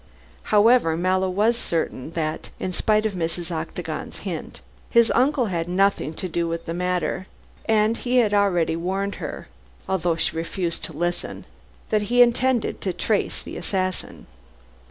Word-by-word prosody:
However, 210 -6 +4
Mallow 185 +2 +1
was 210 +6 +2
certain 165 - -2
that, 155 -2 -3
in 185 - -3
spite 215 +3 +2
of 215 - 0
Mrs. 175 0 -3
Octagon's 160 -1 -5
hint, - - -5 0.3
his 235 -1 +5
uncle 265 0 +3
had 170 -5 -2
nothing 185 -4 +1
to 185 - -4
do 170 0 -1
with 165 0 -3
the 165 - -3
matter, 180 0 -1 0.4
and 220 +1 +3
he 250 0 0
had 220 -4 +4
already 180 -5 +3
warned 190 +4 -1
her - - -6 0.4
although 175 -3 +1
she 160 - -1
refused 170 +1 -3
to - - -9
listen 175 0 -3 0.5
that 215 -1 +3
he 245 0 +7
intended 240 0 +1
to 185 - -1
trace 210 +2 -1
the - - -7
assassin. 185 -2 -3
185 Hz, 155 wpm, -24 LUFS, 170-215 Hz, 0.5 s, he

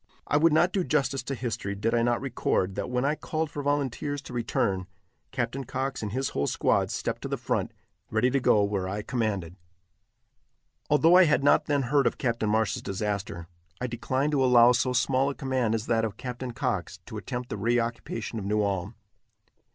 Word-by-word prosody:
I - - -1
would 160 +2 +5
not 175 +4 +3
do 190 - +1
justice 135 -4 0
to 135 - -3
history 115 -5 -3
did 110 +3 -1
I 120 - +3
not 120 0 +2
record, 115 -7 0
that, - - -4
when 125 +1 0
I 145 - +2
called 155 0 -3
for 145 - -4
volunteers 145 0 -1
to - - -10
return, 95 -5 -1 0.4
Captain 130 +1 -2
Cox 130 +1 -3
and 105 -2 -4
his 130 +4 -1
whole 70 - -1
squad - - +1
stepped - - -3
to - - -4
the - - -2
front, - - -1 0.4
ready 115 +4 +2
to 140 - +2
go 105 -4 +4
where 100 -2 -1
I 105 +2 -3
commanded. 100 -8 -2 1.3
Although 160 +3 +5
I 185 0 +8
had 150 -3 +2
not 145 - +4
then 145 -2 +1
heard 140 +2 +2
of - - -1
Captain 115 -4 -1
Marsh's 110 0 +1
disaster, 100 -3 -3 0.3
I 125 - -2
declined 130 +4 -1
to 140 -3 +2
allow 125 -1 +7
so 125 +1 +1
small 130 +2 +2
a 140 - -4
command 130 -5 0
as 110 0 -3
that 115 -1 +1
of 105 -2 -3
Captain 125 0 -5
Cox 120 - -2
to - - -7
attempt 125 0 -5
the - - -4
reoccupation 115 0 -1
of 100 - -6
New 105 +1 +1
Ulm. 100 +1 -2
120 Hz, 200 wpm, -27 LUFS, 110-135 Hz, 1.3 s, I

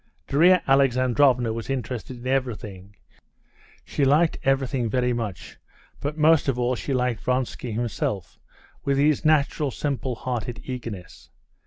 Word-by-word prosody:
Darya 175 +5 +5
Alexandrovna 130 -2 +3
was 115 +2 -6
interested 125 -1 -4
by 130 - -1
everything. 105 -7 -3 0.9
She 145 - -1
liked 150 +5 +3
everything 135 -3 0
very 125 +1 +1
much, 115 -5 -5 0.4
but 150 +2 -4
most 155 -1 +4
of 135 -3 0
all 125 0 +1
she 130 - -4
liked 125 -3 0
Vronsky 125 -1 -2
himself 105 -4 -3 0.4
with 140 -1 +1
his 145 0 +2
natural, 150 -1 +2
simple 135 -2 -3
hearted 120 -1 -4
eagerness. 115 -8 -8
130 Hz, 130 wpm, -24 LUFS, 120-140 Hz, 0.9 s, Darya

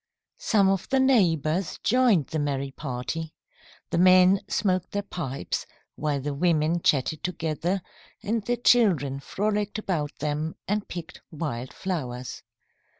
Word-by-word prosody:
Some 205 -4 +3
of 195 -1 0
the 265 - +3
neighbours 180 - +2
joined 235 - +4
the 160 - -3
merry 140 -2 -2
party. 150 +4 -5 0.6
The - - +1
men 185 +1 +6
smoked 185 -3 0
their 205 0 -1
pipes, 150 -9 -4 0.3
while 145 -2 -1
the 145 +2 -3
women 165 +1 +1
chatted 150 +1 +1
together 175 +1 -2 0.4
and 225 +1 -1
the 245 +3 0
children 180 - +3
frolicked 205 +7 -2
about 160 -9 -2
them 150 +2 -2
and 205 +1 -1
picked 170 -2 -8
wild 140 -6 -4
flowers. 130 -10 -4
170 Hz, 130 wpm, -26 LUFS, 145-200 Hz, 0.6 s, men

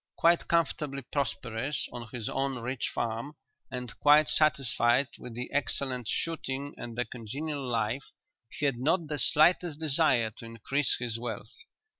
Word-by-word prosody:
Quite 170 +1 +4
comfortably 150 -4 0
prosperous 125 0 -2
on 120 -1 -6
his 115 -3 -4
own 135 0 -1
rich 125 +1 -2
farm, 120 +6 -3 0.3
and 125 -3 -5
quite 150 +1 +6
satisfied 135 -3 +3
with 120 -2 -8
the 125 +1 -4
excellent 130 -4 0
shooting 145 -3 -2
and 120 -1 -7
the 125 - +1
congenial 140 +6 -5
life, 120 +1 -1 0.4
he 145 - -3
had 135 -4 +1
not 160 +6 +2
the 150 -1 -1
slightest 155 +5 +4
desire 140 -7 +3
to 115 - -9
increase 115 +5 0
his 115 -2 -3
wealth. 115 -2 -5
130 Hz, 145 wpm, -30 LUFS, 120-145 Hz, 0.4 s, quite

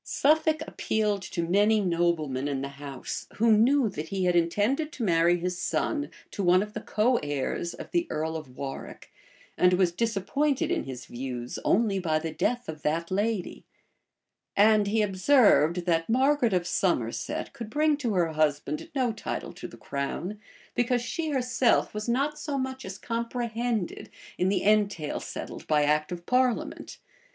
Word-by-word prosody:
Suffolk 315 +1 +2
appealed 210 -2 -1
to 170 -2 -3
many 205 +4 +4
noblemen 170 -7 0
in 135 -2 -2
the 140 - -3
house, 140 -3 -6
who 230 +1 +3
knew 250 +4 +4
that 160 -6 -5
he 190 0 -1
had 180 -1 +2
intended 210 - +1
to 245 - -4
marry 170 -2 +3
his 180 +1 -3
son 295 -2 -1 0.2
to 205 - -4
one 180 +1 +4
of 210 0 -9
the - - -5
coheirs 170 - 0
of - - -9
the 345 -1 +1
earl 160 +1 -2
of 140 -5 -8
Warwick, 135 -1 -7 0.5
and 180 0 +5
was 180 -1 +3
disappointed 230 - 0
in - - 0
his 130 -2 -7
views 125 -1 -5
only 205 -2 +2
by 160 -4 +1
the 160 +1 -3
death 245 +9 -1
of 155 -1 -7
that 165 +4 -1
lady: 205 0 -1 0.9
and 210 0 +5
he 215 +1 +2
observed, 190 - +4
that 165 0 +1
Margaret 260 0 +3
of 180 -1 +1
Somerset 130 - -1
could 230 -2 -7
bring 305 +3 +2
to 240 -8 -1
her 175 -2 +2
husband 155 - 0
no 255 -3 +2
title 215 - -5
to - - -8
the - - -13
crown; 170 +9 -4 0.3
because 245 0 +1
she 320 +5 -3
herself 250 -3 +2
was 215 +2 -4
not 285 +5 0
so 295 -2 -3
much 260 0 -4
as 190 0 -6
comprehended 235 -3 -3 0.3
in 180 - +2
the 195 - 0
entail 205 -7 +1
settled - - -7
by 150 -1 +3
act 150 +2 +1
of 175 -1 -6
parliament. 250 -1 0
200 Hz, 165 wpm, -27 LUFS, 165-245 Hz, 0.9 s, and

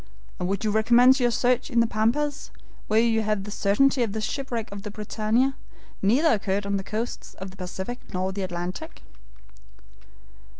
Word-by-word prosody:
"And 180 - -1
would 200 +2 -1
you 215 - +2
recommence 240 +5 +5
your 245 -1 +3
search 245 +3 +1
in 235 -4 +2
the 230 - +5
Pampas, 235 +7 0 0.4
when 220 +1 +4
you 225 -1 +2
have 210 -2 -1
the 210 - -7
certainty 250 +7 +2
that 225 -4 0
the 220 - -2
shipwreck 235 -1 -3
of 200 0 -6
the 210 - -6
BRITANNIA 215 +5 0 0.5
neither 255 +12 +4
occurred 200 -1 -1
on 200 0 0
the 195 - -4
coasts 220 +4 -5
of 190 0 -7
the 190 - -16
Pacific 190 +6 -5
nor 185 +1 -1
the 195 +1 -4
Atlantic?" 175 -1 -5
215 Hz, 175 wpm, -25 LUFS, 200-245 Hz, 0.5 s, recommence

